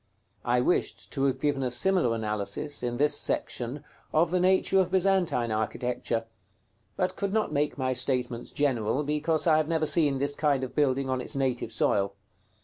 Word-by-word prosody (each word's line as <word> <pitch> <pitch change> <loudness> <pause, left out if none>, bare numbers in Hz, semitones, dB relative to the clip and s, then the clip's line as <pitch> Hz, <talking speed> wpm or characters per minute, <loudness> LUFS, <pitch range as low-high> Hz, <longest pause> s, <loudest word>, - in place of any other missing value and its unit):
I 125 0 +2
wished 175 +8 -1
to 135 -2 0
have 130 -1 0
given 145 -1 0
a 130 - 0
similar 125 0 +2
analysis, 105 +6 -2
in 120 -1 -2
this 145 +2 +2
section, 125 +4 -2 0.3
of 160 +2 +2
the 180 - +2
nature 190 +1 +3
of 185 -2 +2
Byzantine 185 - +1
architecture; 115 +1 -2 0.7
but - - -1
could 200 -1 -2
not 215 -7 0
make 145 0 0
my 130 -1 0
statements 125 -1 -2
general, 130 -2 0
because 150 +2 0
I 160 -2 +5
have 155 -1 +1
never 160 -1 +1
seen 150 -4 +2
this 140 +2 0
kind 145 -2 +1
of 130 - -5
building 135 -2 +1
on 130 -1 -1
its - - -6
native 130 -4 -1
soil. 100 -2 +1
135 Hz, 175 wpm, -27 LUFS, 125-155 Hz, 0.7 s, I